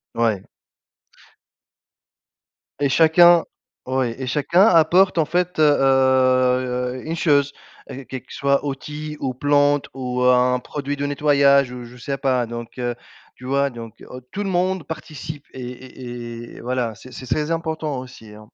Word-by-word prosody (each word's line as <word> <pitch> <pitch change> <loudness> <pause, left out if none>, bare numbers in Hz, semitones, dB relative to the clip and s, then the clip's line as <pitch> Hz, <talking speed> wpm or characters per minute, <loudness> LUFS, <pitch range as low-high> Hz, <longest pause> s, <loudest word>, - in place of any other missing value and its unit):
Ouais. 115 -5 0 2.4
Et 140 - +3
chacun 170 +3 +6 0.4
ouais 130 -2 -1
et 130 - -4
chacun 150 +7 +2
apporte 180 0 +4
en 160 - +3
fait, 180 0 -1
heu - - +5
heu, 130 -2 +2
une 165 +1 -3
chose 145 -3 +2 0.4
et 135 0 -8
quelque 130 +1 -9
soit 140 0 +1
outil, 150 +2 -6
ou 130 -2 -2
plante, 145 +1 +2
ou 125 -1 -3
un 125 0 +4
produit 145 +2 -5
de 145 0 -3
nettoyage, 140 -2 +3
ou 125 -1 -7
je 125 +1 -13
sais 135 +3 -4
pas 130 -3 +1
donc 120 +1 -8
heu, 120 -1 -2 0.4
tu 125 - -17
vois? 140 +1 +1
Donc 115 -3 -11
aut 125 0 -9
tout 195 +12 -6
le 195 - -3
monde 185 -2 0
participe 155 -2 -8
et 130 - -8
et 120 -2 -9
et - - -10
voilà 120 -2 -2
c'est 130 - -14
c'est 130 - -9
très 150 +6 -1
important 160 -3 -2
aussi, 125 -4 -12
hein. 105 0 -14
135 Hz, 155 wpm, -21 LUFS, 125-150 Hz, 2.4 s, chacun